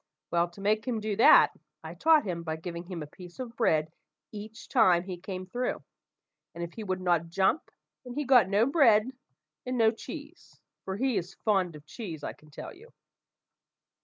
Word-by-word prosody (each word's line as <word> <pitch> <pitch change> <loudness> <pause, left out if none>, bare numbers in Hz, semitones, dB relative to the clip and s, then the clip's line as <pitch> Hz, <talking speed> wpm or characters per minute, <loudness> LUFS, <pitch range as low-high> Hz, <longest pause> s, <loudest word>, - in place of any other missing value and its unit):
Well, 170 0 +2
to 175 +3 -13
make 215 +4 +1
him 235 -3 -1
do 215 -1 -2
that, - - +7 0.3
I - - -7
taught 315 -4 +4
him 175 -3 -3
by 160 -1 -3
giving 170 +2 -7
him 175 -3 -6
a - - -6
piece 175 +4 -13
of 245 -2 -7
bread 155 -9 +2 0.4
each 215 +1 -9
time 185 -8 +4
he 185 -1 -5
came 185 0 -6
through; 245 +7 -3 0.7
and 170 - -4
if 170 - -6
he 225 - -7
would 185 -2 -2
not 170 -2 +1
jump, 190 - +1 0.3
then 250 -1 -8
he 295 - -2
got 250 -6 +5
no 205 +3 +3
bread 255 -5 +4 0.5
and 255 0 -3
no 225 -1 +5
cheese, 295 +8 -10 0.3
for 190 0 -3
he 260 0 +1
is 180 +2 -4
fond 190 -6 +2
of 150 0 -13
cheese, 165 - -7
I - - -4
can 150 - -21
tell 145 - -9
you. 455 +6 -17
200 Hz, 190 wpm, -29 LUFS, 175-240 Hz, 0.7 s, that